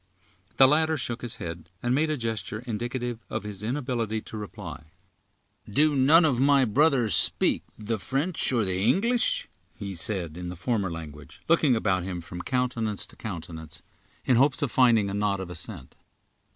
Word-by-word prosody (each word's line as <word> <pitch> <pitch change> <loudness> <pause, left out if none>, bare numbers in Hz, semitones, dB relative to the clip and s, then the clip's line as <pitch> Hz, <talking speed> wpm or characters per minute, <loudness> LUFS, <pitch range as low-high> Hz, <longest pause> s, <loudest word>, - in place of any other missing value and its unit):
The 135 - +8
latter 155 +2 +2
shook 120 -3 -3
his 120 -2 -5
head, 85 0 -7
and 120 +1 +1
made 155 +4 +2
a 155 - -1
gesture 115 -1 -4
indicative 120 +1 -3
of - - -3
his 105 -2 -6
inability 120 -2 -2
to - - -9
reply. 105 -7 -8 0.8
"Do 150 +7 +3
none 150 +6 +6
of 130 -6 +1
my 140 0 +5
brothers 125 - +3
speak 85 - +3 0.2
the 110 0 -3
French 140 - -1
or 115 -4 +2
the 95 0 -1
English?" 235 - +2 0.3
he 100 -3 -5
said, 85 -2 -2
in 90 0 -5
the 90 - -6
former 100 +2 -1
language, 75 0 -9
looking 160 -6 +4
about 95 -4 +1
him 90 -1 -4
from 90 +1 -8
countenance 120 -3 -1
to - - -16
countenance, 80 -6 -8 0.4
in 125 - +4
hopes 135 +2 +3
of 135 - -1
finding 115 -5 +4
a 100 - -4
nod 100 -1 0
of 95 -2 -6
assent. 90 - -6
110 Hz, 170 wpm, -26 LUFS, 95-130 Hz, 0.8 s, The